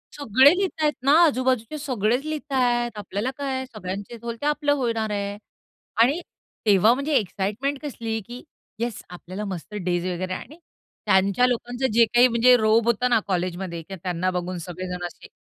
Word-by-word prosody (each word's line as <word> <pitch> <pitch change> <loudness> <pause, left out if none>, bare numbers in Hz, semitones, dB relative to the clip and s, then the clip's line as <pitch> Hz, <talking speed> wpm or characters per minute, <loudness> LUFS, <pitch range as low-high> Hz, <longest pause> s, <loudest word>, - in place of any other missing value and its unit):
सगळे 265 0 +5
लिहतायत 320 -6 0
ना 275 - +5
आजूबाजूचे 255 -2 0
सगळेच 250 -2 0
लिहतायत. 250 -6 0
आपल्याला 210 +4 -3
काय? 265 -2 -2
सगळ्यांचे 205 -1 -7
होईल 235 -1 -4
ते - - -3
आपलं 295 -1 +2
होणार 225 -3 -1
आहे. 200 0 -3 0.6
आणि 275 +8 +4 0.5
तेव्हा 210 +3 +5
म्हणजे 280 +4 -2
एक्साईटमेंट 215 +7 -2
कसली 230 -6 -3
की 245 +1 -9 0.4
येस 235 -2 -3
आपल्याला 185 +3 -7
मस्त 190 +1 -7
डेज 175 0 0
वगैरे 185 +1 -3
आणि 305 - -8 0.5
त्यांच्या 195 +5 +3
लोकांचं 245 +1 -1
जे 230 0 +6
काही 245 +1 +7
म्हणजे 245 +1 +5
रोब 220 0 +3
होता 235 +2 +2
ना 240 -2 +4
कॉलेजमध्ये 180 -2 -2
किंवा 190 +1 -9
त्यांना 180 0 -1
बघून 180 0 -3
सगळेजण 180 0 -5
असे 175 - -10
230 Hz, 155 wpm, -24 LUFS, 190-260 Hz, 0.6 s, काही